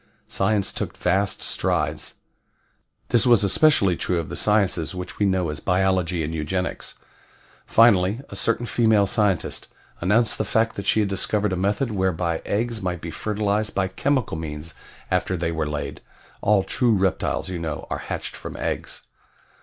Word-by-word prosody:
Science 100 Hz, 0 st, 0 dB
took -, -, -4 dB
vast 95 Hz, +2 st, +1 dB
strides. -, -, 0 dB, 0.9 s
This 120 Hz, +1 st, +3 dB
was 120 Hz, -4 st, +6 dB
especially 100 Hz, -, +4 dB
true 90 Hz, -, -1 dB
of 85 Hz, -, -3 dB
the -, -, -5 dB
sciences 95 Hz, -6 st, +1 dB
which 90 Hz, 0 st, -7 dB
we 100 Hz, -, +3 dB
know 95 Hz, -3 st, +1 dB
as 75 Hz, -, -6 dB
biology 90 Hz, -2 st, +1 dB
and 75 Hz, +2 st, -3 dB
eugenics. 90 Hz, +4 st, -3 dB, 0.7 s
Finally 105 Hz, -2 st, +4 dB
a -, -, -8 dB
certain 115 Hz, +1 st, 0 dB
female 110 Hz, -4 st, +3 dB
scientist 100 Hz, -2 st, 0 dB, 0.3 s
announced 110 Hz, +6 st, +2 dB
the -, -, +2 dB
fact 115 Hz, 0 st, +1 dB
that 100 Hz, 0 st, -5 dB
she 110 Hz, -, +4 dB
had 100 Hz, -, 0 dB
discovered 100 Hz, +1 st, 0 dB
a -, -, 0 dB
method 100 Hz, +7 st, 0 dB
whereby 90 Hz, -4 st, 0 dB
eggs 115 Hz, +2 st, -1 dB
might 90 Hz, -2 st, -2 dB
be 85 Hz, 0 st, -6 dB
fertilized 105 Hz, +3 st, -1 dB
by 95 Hz, -1 st, +1 dB
chemical 125 Hz, -, -1 dB
means 80 Hz, 0 st, -6 dB, 0.4 s
after 95 Hz, -, 0 dB
they 85 Hz, 0 st, -1 dB
were 80 Hz, -2 st, -2 dB
laid 75 Hz, -1 st, -4 dB, 0.4 s
all 105 Hz, -2 st, +3 dB
true 120 Hz, +2 st, +2 dB
reptiles, 95 Hz, -1 st, 0 dB
you 90 Hz, -2 st, -4 dB
know, 80 Hz, -3 st, -4 dB
are -, -, -2 dB
hatched -, -, -5 dB
from -, -, -8 dB
eggs. -, -, -4 dB
95 Hz, 160 wpm, -23 LUFS, 90-105 Hz, 0.9 s, was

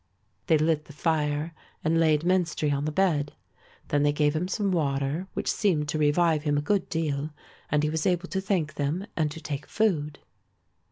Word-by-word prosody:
They 160 Hz, -, +5 dB
lit 155 Hz, 0 st, +1 dB
the 145 Hz, -, -13 dB
fire 150 Hz, 0 st, 0 dB, 0.3 s
and 165 Hz, +1 st, +2 dB
laid 155 Hz, -2 st, +3 dB
Menstrie 175 Hz, -4 st, +1 dB
on 140 Hz, +1 st, -1 dB
the 155 Hz, -, -1 dB
bed. 155 Hz, -5 st, +1 dB, 0.6 s
Then 145 Hz, -, +2 dB
they 145 Hz, 0 st, +4 dB
gave 145 Hz, 0 st, +1 dB
him 170 Hz, +3 st, 0 dB
some 195 Hz, +1 st, 0 dB
water 145 Hz, +1 st, 0 dB
which -, -, 0 dB
seemed 160 Hz, -8 st, +1 dB
to 155 Hz, -, -1 dB
revive 155 Hz, +1 st, +3 dB
him 145 Hz, -1 st, +1 dB
a -, -, +1 dB
good 200 Hz, +5 st, 0 dB
deal 150 Hz, -3 st, -1 dB, 0.4 s
and 150 Hz, 0 st, +2 dB
he 150 Hz, -, +2 dB
was 160 Hz, 0 st, 0 dB
able 180 Hz, 0 st, +1 dB
to 190 Hz, -, -1 dB
thank 180 Hz, -6 st, -1 dB
them 150 Hz, +7 st, -2 dB
and 155 Hz, -2 st, +1 dB
to 150 Hz, -, -8 dB
take 145 Hz, -2 st, -5 dB
food. 155 Hz, -9 st, 0 dB
155 Hz, 190 wpm, -27 LUFS, 145-170 Hz, 0.6 s, They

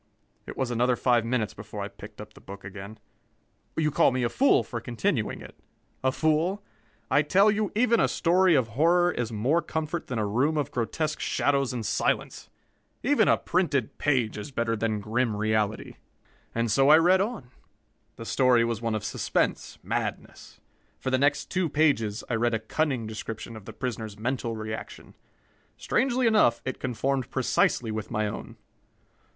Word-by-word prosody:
It -, -, -8 dB
was 130 Hz, -2 st, -1 dB
another 120 Hz, +1 st, +2 dB
five 120 Hz, -2 st, +2 dB
minutes 115 Hz, -3 st, -1 dB
before 105 Hz, 0 st, -7 dB
I -, -, -3 dB
picked 105 Hz, 0 st, -13 dB
up 105 Hz, 0 st, -10 dB
the -, -, -16 dB
book 100 Hz, 0 st, -10 dB
again. 100 Hz, +2 st, -9 dB, 0.8 s
You 155 Hz, -1 st, +1 dB
call -, -, +4 dB
me 130 Hz, 0 st, -1 dB
a 120 Hz, -, +1 dB
fool 275 Hz, -, +3 dB
for 115 Hz, -3 st, -6 dB
continuing 120 Hz, -, -2 dB
it? -, -, -12 dB, 0.5 s
A 130 Hz, -, +3 dB
fool? 160 Hz, +8 st, 0 dB, 0.5 s
I 145 Hz, -, +5 dB
tell 195 Hz, +8 st, +4 dB
you, 210 Hz, 0 st, -1 dB
even 235 Hz, 0 st, +3 dB
a -, -, +4 dB
story 180 Hz, 0 st, +3 dB
of 125 Hz, -5 st, +1 dB
horror 170 Hz, +8 st, +3 dB
is 120 Hz, -7 st, -3 dB
more 125 Hz, +10 st, +1 dB
comfort 160 Hz, +1 st, -4 dB
than 125 Hz, -, -3 dB
a 110 Hz, -, 0 dB
room 130 Hz, +10 st, +1 dB
of 145 Hz, -4 st, -1 dB
grotesque 155 Hz, +6 st, -2 dB
shadows 140 Hz, -2 st, +1 dB
and 120 Hz, -3 st, -4 dB
silence. -, -, -1 dB, 0.5 s
Even -, -, +3 dB
a -, -, +5 dB
printed 160 Hz, -, -1 dB
page 125 Hz, -8 st, +1 dB
is 105 Hz, -, -7 dB
better 115 Hz, -3 st, -1 dB
than 110 Hz, -1 st, -1 dB
grim 115 Hz, +2 st, 0 dB
reality! 110 Hz, 0 st, -1 dB, 0.6 s
And 115 Hz, -1 st, 0 dB
so 135 Hz, +6 st, +4 dB
I 155 Hz, -, +9 dB
read 180 Hz, +3 st, +4 dB
on. 200 Hz, -, -4 dB, 0.6 s
The 115 Hz, -, -9 dB
story 125 Hz, -1 st, +3 dB
was 115 Hz, -2 st, -2 dB
one 115 Hz, -2 st, -1 dB
of 105 Hz, -, -3 dB
suspense, -, -, -1 dB
madness. -, -, -5 dB, 0.4 s
For 130 Hz, -, -3 dB
the 130 Hz, -, +2 dB
next 145 Hz, +1 st, +1 dB
two 185 Hz, -3 st, 0 dB
pages 130 Hz, -9 st, +1 dB
I -, -, -3 dB
read 115 Hz, 0 st, +1 dB
a -, -, -1 dB
cunning 130 Hz, +1 st, -1 dB
description 110 Hz, +1 st, -6 dB
of 110 Hz, -3 st, -11 dB
the -, -, -8 dB
prisoner's 110 Hz, -5 st, -5 dB
mental 120 Hz, 0 st, -2 dB
reaction. 110 Hz, 0 st, -7 dB, 0.6 s
Strangely 255 Hz, -1 st, +1 dB
enough, 215 Hz, -, +4 dB
it 130 Hz, -, -4 dB
conformed 130 Hz, +1 st, -1 dB
precisely 125 Hz, -2 st, +1 dB
with 110 Hz, 0 st, -4 dB
my 110 Hz, 0 st, -1 dB
own. 105 Hz, -, -6 dB
125 Hz, 175 wpm, -27 LUFS, 110-155 Hz, 0.8 s, I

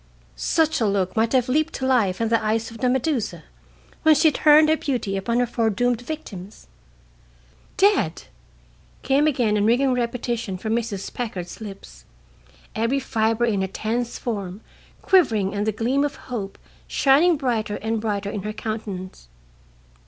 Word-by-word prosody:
Such 320 Hz, -5 st, +1 dB
a 220 Hz, -, +3 dB
look 195 Hz, -2 st, 0 dB
might 225 Hz, +1 st, +2 dB
have 255 Hz, -2 st, +3 dB
leaped 310 Hz, +5 st, +1 dB
to 260 Hz, -, -3 dB
life 225 Hz, -8 st, +2 dB
in 225 Hz, -1 st, 0 dB
the 230 Hz, -1 st, +2 dB
eyes 225 Hz, +1 st, -1 dB
of 225 Hz, -, -11 dB
the 250 Hz, -, +1 dB
Medusa 260 Hz, -1 st, -1 dB, 0.6 s
when 315 Hz, -1 st, +5 dB
she 310 Hz, +2 st, +4 dB
turned 305 Hz, +1 st, +5 dB
her 315 Hz, -, +4 dB
beauty 245 Hz, -10 st, -2 dB
upon 230 Hz, +5 st, -1 dB
her 245 Hz, -, +3 dB
foredoomed 235 Hz, 0 st, 0 dB
victims. 215 Hz, -, -8 dB, 1.1 s
"Dead!" 390 Hz, -, +2 dB, 0.8 s
came 280 Hz, +3 st, +3 dB
again 245 Hz, -8 st, +1 dB
in 205 Hz, -, +1 dB
ringing 255 Hz, +3 st, +3 dB
repetition 235 Hz, -4 st, -2 dB
from 220 Hz, +4 st, -3 dB
Mrs. 220 Hz, -4 st, -4 dB
Packard's 195 Hz, -6 st, -5 dB
lips, 195 Hz, -, -10 dB, 0.7 s
every 230 Hz, +5 st, +1 dB
fiber 225 Hz, -2 st, 0 dB
in 205 Hz, -4 st, 0 dB
her 190 Hz, -, 0 dB
tense 230 Hz, +5 st, -3 dB
form 200 Hz, -4 st, -4 dB, 0.4 s
quivering 225 Hz, -, +3 dB
and 205 Hz, +1 st, -2 dB
the -, -, +3 dB
gleam 245 Hz, +7 st, 0 dB
of 290 Hz, -1 st, -2 dB
hope 205 Hz, -6 st, -6 dB, 0.3 s
shining 300 Hz, +5 st, +4 dB
brighter 230 Hz, -6 st, -1 dB
and 220 Hz, +1 st, -2 dB
brighter 205 Hz, -2 st, -2 dB
in 205 Hz, -, -4 dB
her 210 Hz, +2 st, -4 dB
countenance. 200 Hz, -, -6 dB
230 Hz, 155 wpm, -23 LUFS, 205-260 Hz, 1.1 s, when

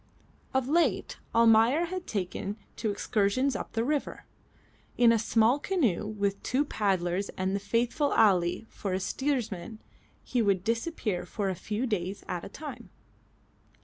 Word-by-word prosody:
Of 265 Hz, -1 st, 0 dB
late 335 Hz, +4 st, +1 dB, 0.2 s
Almayer 230 Hz, +7 st, +5 dB
had 365 Hz, +1 st, -5 dB
taken 200 Hz, +1 st, -3 dB, 0.2 s
to 220 Hz, -, -1 dB
excursions 210 Hz, +6 st, +1 dB
up -, -, -5 dB
the 225 Hz, -, 0 dB
river. 290 Hz, +3 st, -2 dB, 0.7 s
In 240 Hz, -1 st, +6 dB
a 230 Hz, -, +3 dB
small 225 Hz, +4 st, +3 dB
canoe 260 Hz, -, 0 dB
with 200 Hz, -2 st, -2 dB
two 270 Hz, +4 st, +1 dB
paddlers 195 Hz, -5 st, 0 dB
and 190 Hz, +1 st, 0 dB
the -, -, 0 dB
faithful 235 Hz, +8 st, 0 dB
Ali 180 Hz, -1 st, +3 dB
for 195 Hz, -3 st, -4 dB
a 185 Hz, -, 0 dB
steersman 225 Hz, -3 st, -2 dB, 0.4 s
he 245 Hz, -, 0 dB
would 195 Hz, -4 st, +2 dB
disappear 230 Hz, -, -1 dB
for 205 Hz, -3 st, -3 dB
a -, -, 0 dB
few 215 Hz, +7 st, -3 dB
days 200 Hz, -4 st, -2 dB
at 175 Hz, -1 st, -3 dB
a -, -, -7 dB
time. 265 Hz, -2 st, -8 dB
220 Hz, 145 wpm, -29 LUFS, 200-255 Hz, 0.7 s, In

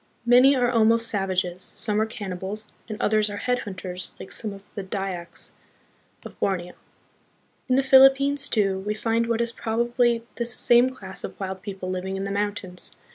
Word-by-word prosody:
Many 250 Hz, +3 st, +6 dB
are 245 Hz, -1 st, +2 dB
almost 230 Hz, 0 st, +3 dB
savages, 185 Hz, -4 st, -1 dB
some 210 Hz, +2 st, -2 dB
are 220 Hz, -, 0 dB
cannibals, 205 Hz, 0 st, -5 dB, 0.2 s
and 215 Hz, -, -6 dB
others 215 Hz, 0 st, +2 dB
are 205 Hz, -, -5 dB
headhunters 190 Hz, -6 st, -4 dB
like -, -, -10 dB
some 215 Hz, -3 st, -4 dB
of 195 Hz, 0 st, -11 dB
the 200 Hz, -, -4 dB
Dyaks 190 Hz, -3 st, -5 dB, 0.7 s
of -, -, -11 dB
Borneo. 180 Hz, -2 st, -1 dB, 1.0 s
In 255 Hz, -, +4 dB
the 270 Hz, -, +3 dB
Philippines, 270 Hz, +1 st, +6 dB
too, 195 Hz, -3 st, +1 dB
we 210 Hz, +2 st, -3 dB
find 230 Hz, +1 st, 0 dB
what 230 Hz, 0 st, 0 dB
is 235 Hz, 0 st, 0 dB
probably 235 Hz, +1 st, 0 dB
this 235 Hz, 0 st, 0 dB
same 240 Hz, +1 st, +4 dB
class 190 Hz, -7 st, -7 dB
of -, -, -7 dB
wild 190 Hz, -1 st, -5 dB
people 190 Hz, -3 st, -6 dB
living 185 Hz, +1 st, -3 dB
in 195 Hz, -, -3 dB
the 200 Hz, -, -3 dB
mountains. 200 Hz, -3 st, 0 dB
210 Hz, 170 wpm, -24 LUFS, 190-235 Hz, 1.0 s, Many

